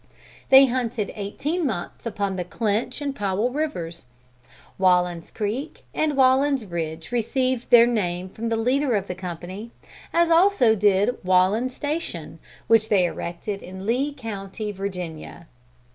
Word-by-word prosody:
They 270 +1 +9
hunted 240 -4 -2
eighteen 285 - -3
months 220 - -4
upon 200 -3 -2
Clinch 215 - -1
and 280 -1 -3
Powell 205 +3 0
rivers. 175 - -4 0.7
Wallen's 180 -2 +2
Creek 235 +8 -4
and 300 -3 0
Wallen's 265 -1 +3
Ridge 165 -1 -5
received 255 +1 0
their 235 -1 +8
name 185 -6 -1
from 230 +4 -4
the 225 - 0
leader 255 +2 +1
of 195 -2 -1
the 180 - -4
company; 185 +4 -7 0.4
as 340 0 +3
also 330 - +5
did 205 +2 +2
Wallen's 190 +8 +2
Station 305 +3 -4 0.3
which 220 -1 +3
they 190 -4 +4
erected 175 +4 -4
in 185 +1 -9
the 190 - -7
Lee 255 +6 +1
county, 215 -5 -6
Virginia. 180 -4 -6
215 Hz, 135 wpm, -24 LUFS, 185-260 Hz, 0.7 s, They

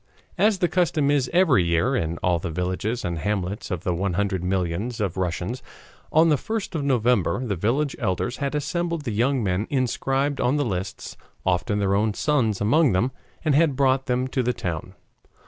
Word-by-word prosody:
As 210 +1 +4
the 180 -2 +2
custom 155 -5 +1
is 135 -4 +1
every 165 - +4
year, 85 +10 +1
in 85 -7 -1
all 90 -1 +2
the 85 - -4
villages 90 +8 -2
and 85 -2 -2
hamlets 100 +2 -2
of 90 -3 -3
the 90 - 0
one 95 +2 -1
hundred 95 -1 -1
millions 95 +5 -1
of 100 -5 -1
Russians, 90 +6 -2 0.5
on 160 +2 +5
the 150 - +4
1st 220 - -4
of 155 -4 -2
November, 125 -2 +1
the 105 -4 -1
village 130 - 0
elders 115 +2 -1
had 140 0 -2
assembled 170 +2 -2
the 120 - -3
young 125 +3 +1
men 95 +2 0
inscribed 135 +1 0
on 125 +4 +2
the 145 - +1
lists, 95 -3 -4 0.3
often 95 +3 +1
their 100 -1 +1
own 105 +1 +1
sons 120 -9 +1
among 140 - +3
them, 115 +8 +1 0.3
and 155 - +3
had 150 -1 +3
brought 135 0 +2
them 125 0 0
to 130 - 0
the 125 0 0
town. 85 -8 -5
120 Hz, 190 wpm, -24 LUFS, 95-140 Hz, 0.5 s, on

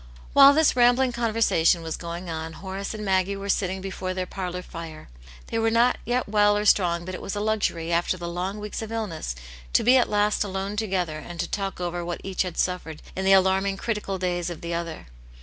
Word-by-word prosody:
While 280 0 +9
this 315 -3 +4
rambling 245 +1 +4
conversation 225 -8 +2
was 160 -1 -3
going 170 +1 -6
on, 160 -1 -5
Horace 195 +3 -5
and 210 -1 -5
Maggie 190 0 +1
were 200 0 -6
sitting 190 -1 0
before 190 -1 -4
their 185 -1 -2
parlour 180 -1 -5
fire. 165 -3 -9 0.4
They 225 - 0
were 225 0 +2
not 235 +2 +3
yet 245 +1 0
well 205 0 +4
or 210 - -1
strong, 175 -4 +3
but 185 - -6
it - - -6
was 195 - -4
a - - -2
luxury, 205 -6 -1
after 175 +2 +1
the 170 -1 -5
long 180 +4 -3
weeks 210 +1 -5
of 220 0 -6
illness, 195 - -3 0.4
to - - +4
be 250 +3 +6
at 250 - +2
last 210 0 +2
alone 195 +1 -3
together 185 -7 -1
and 170 +2 -9
to - - -1
talk 195 -2 -3
over 175 0 -3
what 175 0 -4
each 190 -2 -2
had 180 -3 -3
suf 180 -1 0
fered 160 -2 -8 0.2
in 190 - -2
the 195 - +6
alarming, 190 +1 +3
critical 210 -3 -2
days 180 -1 -1
of 175 - -7
the 170 0 -4
other. 170 -1 -4
190 Hz, 220 wpm, -25 LUFS, 175-210 Hz, 0.4 s, While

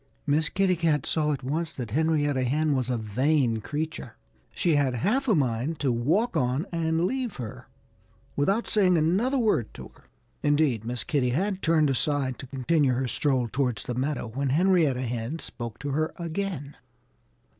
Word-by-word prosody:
Miss 150 +1 +2
Kitty 190 -1 +2
Cat 160 -5 +1
saw 150 -2 +1
at 140 - -3
once 155 +5 -2
that 120 -5 -6
Henrietta 145 -1 +1
Hen 150 +3 +1
was 130 -2 -1
a 125 - 0
vain 120 +3 +1
creature. 150 0 -5 0.4
She 170 -4 +2
had 135 -3 +2
half 245 - 0
a 220 - +4
mind 135 +2 0
to 135 -3 +2
walk 160 - +1
on 130 +6 +1
and 165 0 0
leave 250 -1 -2
her, 125 +1 -7 0.7
without 195 +11 +1
saying 185 -5 +3
another 195 - +2
word 215 - +1
to 65 - -9
her. - - -23 0.4
Indeed, 145 -7 +2
Miss 120 0 -3
Kitty 135 -4 0
had 190 +9 -1
turned 155 -3 +3
aside 135 -2 0
to 135 - -8
continue 135 +1 +1
her 130 +1 -1
stroll 130 -1 0
towards 125 -2 -1
the 125 - -4
meadow 135 +2 -2
when 135 +4 -2
Henrietta 155 -4 +3
Hen 120 +4 -3
spoke 120 -7 -7
to 145 - -5
her 155 +3 -1
again. 170 -4 -4
145 Hz, 170 wpm, -26 LUFS, 125-165 Hz, 0.7 s, a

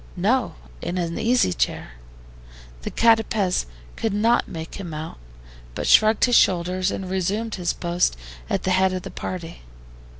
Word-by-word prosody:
"No, - - +1 0.3
in 180 - -3
an 170 -1 -2
easy 235 - +2
chair." - - -2 0.9
The - - -4
CATAPEZ 225 - +2 0.3
could 225 -3 -2
not 230 +3 +2
make 165 +3 -7
him 175 -5 -6
out, 155 - -7 0.6
but - - -3
shrugged 215 0 +5
his 245 -1 +2
shoulders 185 0 +3
and 190 -1 -4
resumed 195 +4 -2
his 175 -2 -1
post 175 - 0 0.3
at - - -1
the 185 - 0
head 185 0 +3
of 185 -1 -4
the - - -7
party. 170 -2 -6
185 Hz, 155 wpm, -23 LUFS, 175-215 Hz, 0.9 s, shrugged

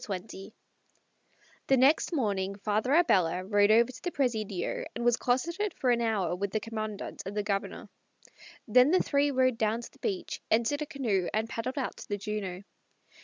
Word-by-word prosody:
XX 195 +1 -6 1.2
The 270 - +4
next 275 +8 +4
morning 200 - -1
Father 215 +5 -1
Abella 185 - +3
rode 205 0 +3
over 230 +3 +5
to 255 - -13
the 355 - -2
Presidio 220 - -2
and 235 - -3
was 240 -1 +5
closeted 340 +13 -1
for 255 -3 +1
an 235 -1 +2
hour 210 -7 0
with 200 +2 -2
the 215 - -1
Commandante 215 -2 -5
and 200 +2 -6
the 210 - 0
Governor. 200 -1 -3 0.8
Then 250 +5 +6
the 370 - +3
three 285 0 +2
rode 255 -3 +1
down 220 +1 +1
to - - -10
the - - -23
beach, 190 -2 -3
entered 235 +7 +1
a 300 - -3
canoe, 215 -11 -1
and 220 +1 0
paddled 235 +4 -4
out 270 - -3
to - - -10
the 205 - -2
Juno. 200 -2 -4
220 Hz, 180 wpm, -29 LUFS, 200-255 Hz, 1.2 s, Then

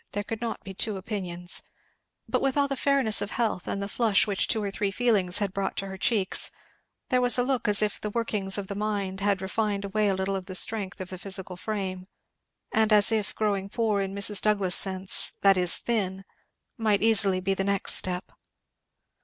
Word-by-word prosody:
There 205 - -2
could 225 +2 -6
not 230 -1 -4
be 195 - -8
two 205 +1 -1
opinions. 180 -3 -2 0.7
But - - 0
with 270 0 0
all 285 -1 +3
the 275 - -3
fairness 270 -5 +2
of 205 - -3
health, 220 -7 -2
and 200 - -3
the - - -4
flush 215 -1 +2
which 200 -2 0
two 220 -2 0
or 200 - -3
three 200 +1 -1
feelings 200 -5 +2
had 200 -3 -2
brought 195 -1 -3
to 195 - -2
her 190 -1 -7
cheeks, 200 -4 +1 0.6
there 255 -1 +2
was 245 0 +5
a 245 - +2
look 255 -2 -1
as 210 0 +4
if 210 - -2
the 210 - -3
workings 210 -3 0
of 200 - -4
the 200 - -6
mind 200 -2 -3
had 200 -1 0
refined 200 +1 -2
away 210 +1 0
a 195 - +1
little 190 +1 -2
of 185 -1 -6
the 185 - -6
strength 200 -1 +1
of 185 - -7
the 185 - -7
physical 190 -1 -2
frame, 185 -2 -5 0.6
and 220 0 +2
as 210 +1 +5
if 215 -2 -1
growing 200 -2 -1
poor 215 -2 0
in 195 0 -4
Mrs. 200 0 +3
Douglass's 200 -4 +2
sense, 190 -1 +2
that 195 -1 +5
is, 180 -1 +5
thin, 195 -5 -2 0.5
might 215 -2 +1
easily 200 -4 +3
be 195 +1 -1
the 195 - -1
next 200 0 +1
step. 180 0 0
200 Hz, 210 wpm, -26 LUFS, 190-215 Hz, 0.7 s, was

